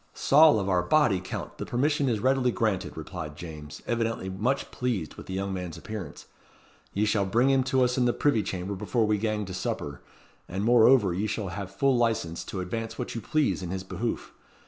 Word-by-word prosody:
"Saul 150 -5 +6
of 100 - -2
our 90 -2 +3
body, 115 -1 +3
Count, 90 - -6
the - - -3
permission 140 +2 +1
is 110 -3 0
readily 130 +1 +2
granted," 110 -8 -1
replied 80 -1 -6
James, 75 -2 -9
evidently 115 -4 -1
much 120 +9 -1
pleased 115 -11 -2
with - - -11
the 95 - -4
young 100 0 -2
man's 90 -3 -5
appearance. 100 -3 -7 0.7
"Ye 105 +2 +1
shall 105 -1 +2
bring 120 +7 +3
him 135 -1 +4
to 130 -1 +3
us 125 +1 +1
in 125 - +3
the 120 - +4
privy 130 -3 +2
chamber 95 0 -4
before 105 +4 0
we 105 -1 +1
gang 110 -1 -1
to 95 - -7
supper, 75 -5 -4 0.5
and 95 +3 -2
moreover 115 -3 +5
ye 100 +5 -1
shall 105 -2 -3
hae 100 +2 -5
full 130 +8 +1
licence 110 -9 0
to 95 - -4
advance 110 +5 -4
what - - -4
you 115 - -4
please 150 -3 +1
in 90 - -5
his 95 +1 -3
behoof. 95 +5 -4
105 Hz, 205 wpm, -27 LUFS, 95-120 Hz, 0.7 s, Saul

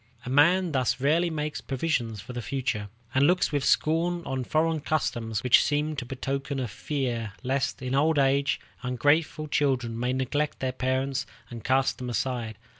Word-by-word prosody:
A 125 - -4
man 170 +6 +4
thus 130 -3 +1
rarely 160 +6 +2
makes 150 -2 -3
provision 135 -5 -1
for 110 +5 -9
the 120 - -4
future, 120 -5 -2 0.2
and 135 +2 +4
looks 180 -1 +2
with 145 -2 0
scorn 170 +4 +2
on 130 -1 -2
foreign 160 +4 +1
customs 120 -8 -1
which 125 -1 +6
seem 150 +1 0
to 125 -3 -4
betoken 135 +2 -3
a 125 - -1
fear 120 -3 -3
lest, 130 0 -1
in 125 0 -2
old 150 +3 +3
age, 140 0 +2 0.2
ungrateful 145 +5 +1
children 125 -6 0
may 125 +1 0
neglect 145 +3 -1
their 130 -1 -1
parents 130 +1 -1 0.2
and 115 -2 -7
cast 130 +1 +2
them 125 -1 -4
aside. 115 -2 -2
135 Hz, 170 wpm, -27 LUFS, 125-150 Hz, 0.2 s, which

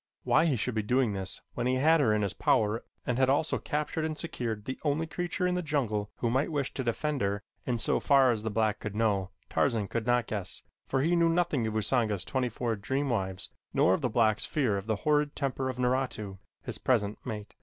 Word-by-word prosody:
Why 160 - +4
he 145 - +2
should 125 +2 -2
be 110 - 0
doing 125 +1 +1
this 95 -1 -3
when 120 0 -1
he 130 - +2
had 160 +5 +4
her 120 -7 +3
in 105 0 +2
his 100 - -1
power 110 +1 +1 0.2
and 125 0 0
had 130 -1 +4
also 145 +3 +2
captured 150 +1 -2
and 155 -1 -2
secured 120 -12 -3
the 130 - -4
only 150 +2 +1
creature 175 +3 -2
in 180 - +2
the 180 - 0
jungle 120 -10 -1
who 115 - -1
might 135 +6 +1
wish 140 -3 -1
to 130 - -3
defend 140 +4 -1
her 100 +1 -1 0.2
in 125 -2 +1
so - - +1
far 135 -3 +5
as 110 -3 -1
the 110 - -2
black 110 0 +1
could 105 -1 -5
know, 100 -4 +1 0.2
Tarzan 110 -4 +1
could 115 +2 -3
not 120 -1 +3
guess, 100 -5 -5 0.2
for 135 - +1
he 170 +3 +3
knew 170 -1 +4
nothing 165 -8 +1
of 110 - -3
Usanga's 110 -3 +1
twenty 130 -2 0
four 115 0 -2
dream 135 +7 -1
wives 95 -4 -2 0.3
nor 95 - +5
of - - 0
the 125 - 0
black's 110 -2 +2
fear 130 -9 +1
of 100 +1 -4
the 110 - +1
horrid 150 -1 +2
temper 135 -2 -1
of 130 - -4
Naratu, 125 -6 -1 0.2
his - - -5
present 110 -5 +1
mate. 105 -4 -6
125 Hz, 230 wpm, -29 LUFS, 105-145 Hz, 0.3 s, far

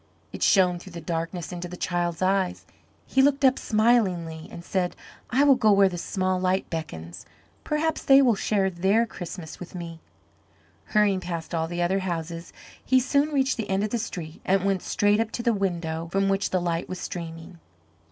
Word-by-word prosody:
It - - -7
shone 175 - +4
through 185 +1 -12
the 170 - -6
darkness 165 +1 -4
into 175 0 -5
the 180 +1 -9
child's 175 0 -1
eyes. 190 -1 0 0.4
He 265 - +2
looked 275 0 +3
up 260 0 +4
smilingly 190 -8 +1
and 170 - -9
said, 180 -2 -1 0.3
"I 265 +4 +3
will 285 -1 +7
go 220 -5 +3
where 200 -1 +5
the 175 - -6
small 185 0 -1
light 185 +1 0
beckons, 85 - -6 0.4
perhaps 310 +1 -1
they 270 0 +7
will 255 -4 +5
share 195 -1 0
their 195 +6 +2
Christmas 175 -6 -8
with 180 +1 -9
me." 170 -2 -7 0.9
Hurrying 210 -3 +2
past 170 -2 -5
all 160 -1 0
the 175 +1 -2
other 190 +3 +1
houses, 170 -2 -4 0.3
he 260 0 +4
soon 280 +4 +2
reached 270 -3 +1
the 220 -3 -4
end 195 +1 +1
of 210 - -2
the 235 - 0
street 170 -7 -6
and 195 0 +1
went 195 -2 +1
straight 205 +1 +2
up 225 -1 0
to 235 - -3
the 235 -1 +3
window 170 -5 -2
from 195 +1 +1
which 195 0 +1
the 185 - +1
light 170 -1 -2
was 185 - -5
streaming. 165 -1 -7
185 Hz, 190 wpm, -25 LUFS, 170-210 Hz, 0.9 s, will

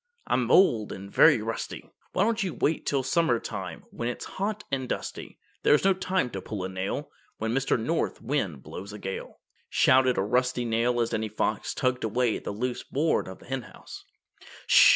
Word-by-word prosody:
I'm 120 -2 +1
old 120 - +5
and 100 +1 -8
very - - +6
rusty, - - -4 0.3
Why 190 - +3
don't 225 +1 +1
you 190 -4 -2
wait 160 - 0
till 140 -2 +1
summertime 130 -3 -1
When 120 - -3
it 125 - -3
is - - -8
hot 205 +2 -3
and 130 -2 -1
dusty. - - -5 0.2
This 150 - +5
is - - -4
no 195 - +6
time 185 -7 -1
to 95 - -5
pull 100 -2 -5
a 95 - -3
nail 95 0 -3 0.3
When 110 +1 -1
Mr. 135 -1 +1
North 160 +9 -1
Wind 110 - -2
blows 100 +2 -8
a - - -6
gale," 95 -1 -6 0.3
shouted 130 -1 +4
a 95 - +2
rusty 125 +3 +1
nail 120 +1 +1
as 115 - 0
Danny 110 0 -1
Fox 110 - -1
tugged 130 0 0
away 115 +1 +1
at - - -13
the - - -2
loose 120 +4 -2
board 155 +4 0
of 95 - -8
the - - -17
Henhouse. 135 -1 -7
125 Hz, 195 wpm, -27 LUFS, 110-145 Hz, 0.3 s, very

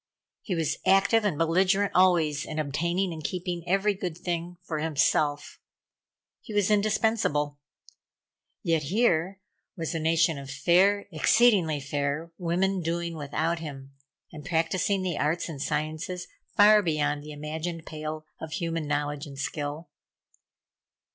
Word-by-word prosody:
He 185 - -3
was 160 -1 -1
active 200 +4 +4
and 195 -8 0
belligerent 185 +5 +2
always 170 -5 +3
in 155 - -6
obtaining 170 +5 -1
and 155 -1 -8
keeping 180 0 -3
every 195 +3 +2
good 180 -4 -5
thing 175 0 -4
for 160 -4 -3
himself. 150 -1 0 0.8
He 215 - -8
was 205 0 +2
indispensable. 205 -9 +1 1.0
Yet 165 -2 +2
here 185 - +1 0.4
was 165 -1 -3
a 165 - -1
nation 160 -1 +2
of 135 -1 -9
fair, 185 +8 +3
exceedingly 175 -2 +4
fair 145 +3 -2
women 185 +2 0
doing 170 0 -2
without 160 +3 -1
him, 140 -4 -8 0.4
and 150 -3 -9
practising 180 +4 0
the 180 -4 -2
arts 155 +4 0
and 150 -5 -7
sciences 155 +4 -3 0.3
far 210 +1 +7
beyond 150 -4 0
the 150 +1 -9
imagined 160 +3 -5
pale 155 0 -6
of 160 -1 -7
human 165 -4 -2
knowledge 145 0 -2
and 140 -1 -10
skill. 145 +3 -4
165 Hz, 135 wpm, -27 LUFS, 150-185 Hz, 1.0 s, far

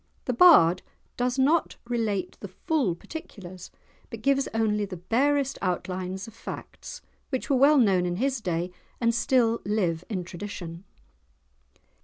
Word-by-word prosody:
The 250 - 0
bard 205 - +7 0.3
does 250 +1 -1
not 300 +5 +2
relate 225 -5 -2
the 200 - -7
full 225 - -1
particulars, 185 - -10 0.4
but - - -9
gives 275 0 +2
only 215 -2 +1
the 190 -2 -5
barest 275 +9 +1
outlines 185 +2 -3
of 225 - -11
facts, - - -9 0.3
which 260 0 -3
were - - +4
well 280 +3 +5
known 190 -8 +3
in 175 - -2
his 265 +4 -1
day, 175 -2 -2 0.3
and 230 -1 +2
still 235 -1 +2
live 180 -5 -1
in 190 -5 -2
tradition. 175 -1 -8
215 Hz, 140 wpm, -26 LUFS, 185-260 Hz, 0.4 s, bard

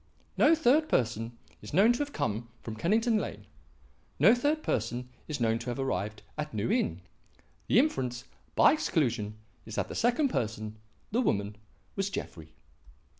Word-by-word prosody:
No 315 +3 +5
third 310 +1 +3
person 115 0 0 0.2
is 105 +7 -7
known 215 +6 +6
to 240 - -3
have 290 0 -2
come 115 - -2
from 110 - -5
Kennington 220 - +2
Lane; 105 - -6 0.7
no 185 - +7
third 290 +5 +1
person 120 +2 -2 0.2
is 150 -3 -3
known 115 -1 +2
to 115 - -5
have 120 - -3
arrived 110 -6 -2 0.2
at 150 -3 -4
New 110 +2 0
Inn. 85 +2 0 0.7
The - - +3
inference, 130 - +1 0.3
by - - +7
exclusion, 120 - 0 0.3
is - - -8
that - - -1
the - - -5
second 245 +5 +2
person 110 - -3 0.3
the 235 +4 +2
woman 100 - 0 0.4
was 195 0 -1
Jeffrey. 80 - -7
125 Hz, 160 wpm, -30 LUFS, -, 0.7 s, no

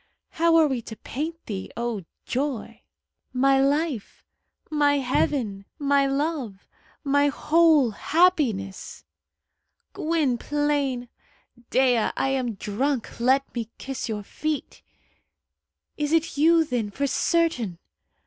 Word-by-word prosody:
How 335 -1 +3
are 325 -1 +6
we 260 -4 -2
to 220 - -9
paint 320 +9 -5
thee, 195 -3 -5
O 235 -6 -3 0.2
joy! 245 -4 -3 0.5
"My 270 +1 +4
life!" 285 -4 -1 0.5
"My 290 -1 +3
heaven!" 250 -6 0
"My 280 -2 +2
love!" 275 -8 -2 0.4
"My 285 0 +3
whole 305 -3 +4
happiness!" 260 - 0 0.9
"Gwynplaine!" 290 -3 0 0.6
"Dea, 250 -4 +3
I 270 - +1
am 255 -4 -1
drunk. 235 +7 -2
Let 265 +3 +2
me 230 -2 -4
kiss 265 -3 -5
your 210 -2 -3
feet." 310 +7 -4 1.2
"Is 295 -1 -1
it 330 0 +1
you, 325 +3 +5
then, 245 -7 -2
for 280 +8 -2
certain?" 275 - +1
275 Hz, 110 wpm, -25 LUFS, 235-300 Hz, 1.2 s, are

